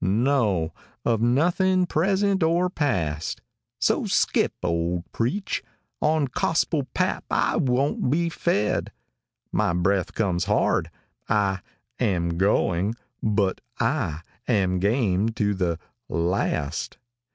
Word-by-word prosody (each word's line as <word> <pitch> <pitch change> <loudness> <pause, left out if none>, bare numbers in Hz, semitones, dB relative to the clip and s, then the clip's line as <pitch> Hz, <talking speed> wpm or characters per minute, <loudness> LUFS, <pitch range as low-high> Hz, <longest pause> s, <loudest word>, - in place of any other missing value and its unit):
No 105 - +2 0.3
of 115 -2 +2
nothing 180 +9 +3
present 195 +4 +1
or 170 +3 +2
past; 85 - -1 0.4
```So - - +1
skip, - - +2
old 85 0 0
preach, 180 - -1 0.4
on 155 -1 +3
gospel 145 +1 0
pap - - 0
I - - +1
won't 130 0 +1
be 170 +5 +2
fed; 160 -10 0 0.6
```My 85 +1 +1
breath 95 +1 +1
comes 90 -5 0
hard; 105 +1 +1 0.4
I 100 -2 +2 0.4
am 85 -3 0
going 100 +1 +2 0.3
but 100 -3 +1 0.2
I 115 - 0 0.3
am 95 -6 +2
game 105 0 +2
to 105 -2 +1
`````the 90 -4 0 0.3
last. 85 -2 -1
105 Hz, 105 wpm, -25 LUFS, 90-145 Hz, 0.6 s, nothing